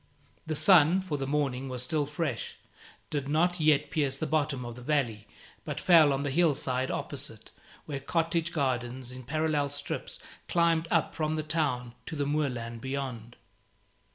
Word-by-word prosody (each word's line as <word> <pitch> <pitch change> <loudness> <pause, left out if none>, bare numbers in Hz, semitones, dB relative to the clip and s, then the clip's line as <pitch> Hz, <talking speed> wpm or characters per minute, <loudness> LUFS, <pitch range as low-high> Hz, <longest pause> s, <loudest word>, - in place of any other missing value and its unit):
The 155 - -1
sun 180 +1 +6
for 155 -6 -3
the 135 - -2
morning 135 -2 -1
was 125 -1 -4
still 145 +2 0
fresh 150 +1 -3 0.6
did 145 -2 -2
not 175 +4 +2
yet 150 -2 +3
pierce 140 -4 +1
to - - -12
the - - +1
bottom 145 -5 0
of 120 -1 -6
the 125 - -10
valley, 120 -6 -1 0.4
but - - -4
fell 165 -5 +6
on 135 +1 0
the 145 - -1
hillside 140 -5 +1
opposite, - - -5 0.3
where 140 -2 -4
cottage 165 +3 0
gardens 130 -4 -1
in 130 0 -8
parallel 150 +2 0
strips 145 0 -4 0.3
climbed 170 -1 +2
up 165 -3 +1
from 155 0 -1
the 155 - -2
town 145 -6 -1
to - - -4
the 145 -1 -1
moorland 125 -6 -2
beyond. 130 -4 -4
145 Hz, 165 wpm, -29 LUFS, 130-155 Hz, 0.6 s, sun